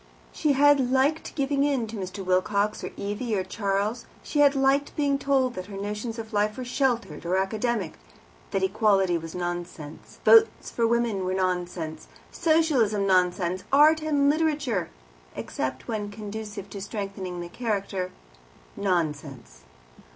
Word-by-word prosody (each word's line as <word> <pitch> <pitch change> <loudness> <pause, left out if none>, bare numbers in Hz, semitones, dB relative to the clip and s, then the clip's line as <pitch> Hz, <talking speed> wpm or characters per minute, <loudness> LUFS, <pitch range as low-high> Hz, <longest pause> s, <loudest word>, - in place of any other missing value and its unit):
She 300 -3 +1
had 280 -2 +4
liked 275 +4 +1
giving 280 -1 +1
in 275 -5 +1
to 220 +1 -8
Mr. 190 -1 -5
Wilcox, 200 +3 +1
or - - -3
Evie, 210 +3 -2
or 190 - 0
Charles; 205 +4 -2 0.2
she 295 - -2
had 285 -1 +6
liked 275 +1 +2
being 280 -2 +1
told 265 -3 +1
that 185 -4 -6
her 200 -1 -8
notions 210 +3 -4
of 225 0 -7
life 210 +1 +1
were 255 - -4
sheltered 240 - -1
or 180 +2 0
academic; 210 - -1 0.5
that 195 - -1
Equality 195 -2 +3
was 165 +1 -8
nonsense, 175 -4 -6
Votes 450 -1 +5
for 230 -1 +1
Women 235 -3 +1 0.2
nonsense, 180 -4 -2 0.2
Socialism 295 - +2
nonsense, 180 -1 +1
Art 305 +3 +6
and 290 -2 +2
Literature, 290 - +1 0.5
except 130 0 -4
when 210 -2 -3
conducive 210 -1 -7
to 200 - -6
strengthening 195 -3 -5
the 175 - -5
character, 200 -3 -2 0.7
nonsense. 150 - -2
210 Hz, 140 wpm, -26 LUFS, 185-265 Hz, 0.7 s, had